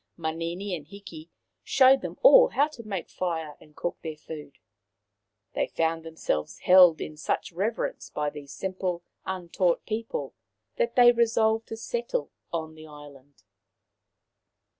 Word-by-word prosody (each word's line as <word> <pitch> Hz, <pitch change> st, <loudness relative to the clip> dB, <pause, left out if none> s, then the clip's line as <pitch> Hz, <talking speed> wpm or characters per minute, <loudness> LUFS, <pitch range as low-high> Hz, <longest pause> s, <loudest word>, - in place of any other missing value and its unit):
Manini 170 Hz, +4 st, -3 dB
and 150 Hz, -3 st, -10 dB
Hiki 175 Hz, -4 st, -11 dB, 0.3 s
showed 265 Hz, 0 st, +5 dB
them -, -, -6 dB
all -, -, +9 dB
how 290 Hz, -, +2 dB
to 275 Hz, -6 st, -11 dB
make 200 Hz, -6 st, -5 dB
fire 160 Hz, -4 st, -3 dB
and 150 Hz, -1 st, -19 dB
cook 175 Hz, -, -4 dB
their 160 Hz, -2 st, -5 dB
food. 150 Hz, -2 st, -10 dB, 1.0 s
They -, -, 0 dB
found 165 Hz, 0 st, -1 dB
themselves 160 Hz, -, -3 dB
held 180 Hz, -3 st, +7 dB
in 155 Hz, -, -6 dB
such 155 Hz, +4 st, -2 dB
reverence 205 Hz, +7 st, -3 dB
by 150 Hz, -1 st, -2 dB
these 145 Hz, -2 st, -10 dB
simple, 185 Hz, 0 st, -3 dB, 0.2 s
untaught 180 Hz, -1 st, -1 dB
people 225 Hz, -, -4 dB, 0.4 s
that 485 Hz, -1 st, 0 dB
they 245 Hz, -1 st, +8 dB
resolved 225 Hz, -1 st, +2 dB
to 225 Hz, -, -6 dB
settle 480 Hz, -, -3 dB, 0.2 s
on 160 Hz, -2 st, -4 dB
the 155 Hz, 0 st, -13 dB
island. 145 Hz, -3 st, -15 dB
175 Hz, 140 wpm, -27 LUFS, 155-225 Hz, 1.0 s, all